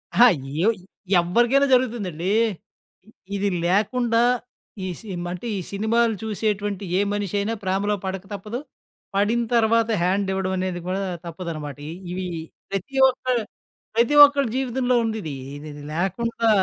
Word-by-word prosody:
అహా! 240 Hz, -, +8 dB, 0.4 s
ఎవ్ 230 Hz, -, +4 dB, 0.5 s
ఎవరికైనా 240 Hz, +10 st, +3 dB
జరుగుతుందండి. 205 Hz, -9 st, 0 dB, 0.8 s
ఇ -, -, -17 dB, 0.3 s
ఇది 200 Hz, 0 st, +1 dB, 0.2 s
లేకుండా, 230 Hz, +5 st, +2 dB, 0.6 s
ఈ -, -, -2 dB
సిమ్ 180 Hz, -5 st, -5 dB
అంటే 180 Hz, +6 st, -6 dB
ఈ -, -, -2 dB
సినిమాలు 225 Hz, +3 st, +2 dB
చూసేటువంటి 205 Hz, -2 st, -2 dB
ఏ -, -, +3 dB
మనిషి 205 Hz, -1 st, -2 dB
అయినా 210 Hz, +3 st, -1 dB
ప్రేమలో 195 Hz, +2 st, +1 dB
పడక 190 Hz, 0 st, -3 dB
తప్పదు, 210 Hz, +5 st, -5 dB, 0.6 s
పడిన 215 Hz, +4 st, +2 dB
తరువాత 230 Hz, 0 st, +3 dB
హ్యండ్ 190 Hz, +3 st, +1 dB
ఇవ్వడం 190 Hz, 0 st, -1 dB
అనేది 185 Hz, -1 st, -2 dB
కూడా 190 Hz, +2 st, -1 dB, 0.2 s
తప్పదనమాట 165 Hz, -4 st, -6 dB, 0.3 s
ఇవి 185 Hz, +1 st, -3 dB, 0.5 s
ప్రతి 200 Hz, +8 st, -4 dB
ఒక్క 255 Hz, -, -7 dB, 0.7 s
ప్రతి 240 Hz, +6 st, +3 dB
ఒక్కలి 280 Hz, -4 st, 0 dB
జీవితంలో 255 Hz, -1 st, +1 dB
ఉంది 220 Hz, -1 st, -1 dB
ఇది. 155 Hz, -, -4 dB, 0.4 s
ఇది 145 Hz, 0 st, -10 dB
లేకుండా 225 Hz, +6 st, 0 dB
205 Hz, 130 wpm, -23 LUFS, 185-235 Hz, 0.8 s, అహా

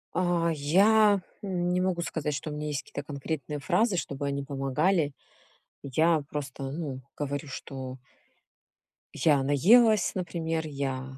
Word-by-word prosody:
А, 175 Hz, -2 st, +2 dB
я 200 Hz, +7 st, +4 dB, 0.2 s
н 180 Hz, -3 st, -1 dB
не 180 Hz, -, +2 dB
могу 185 Hz, -2 st, 0 dB
сказать, 155 Hz, -3 st, -2 dB
что 150 Hz, +2 st, -4 dB
у -, -, -5 dB
меня 150 Hz, 0 st, -4 dB
есть 145 Hz, -2 st, -2 dB
какие-то 145 Hz, -, -7 dB
конкретные 145 Hz, 0 st, -4 dB
фразы, 190 Hz, +8 st, +2 dB
чтобы 140 Hz, -3 st, -3 dB
они 140 Hz, 0 st, -2 dB
помогали. 145 Hz, +4 st, 0 dB, 0.7 s
Я 155 Hz, +3 st, +2 dB
просто, 135 Hz, -2 st, -5 dB
ну, 140 Hz, -3 st, -4 dB, 0.2 s
говорю, 145 Hz, 0 st, -3 dB
что 130 Hz, -1 st, -7 dB, 1.2 s
я 145 Hz, -4 st, +3 dB
наелась, 210 Hz, -, +5 dB
например, 165 Hz, -3 st, -2 dB
я, 135 Hz, -2 st, -4 dB
150 Hz, 135 wpm, -28 LUFS, 140-175 Hz, 1.2 s, наелась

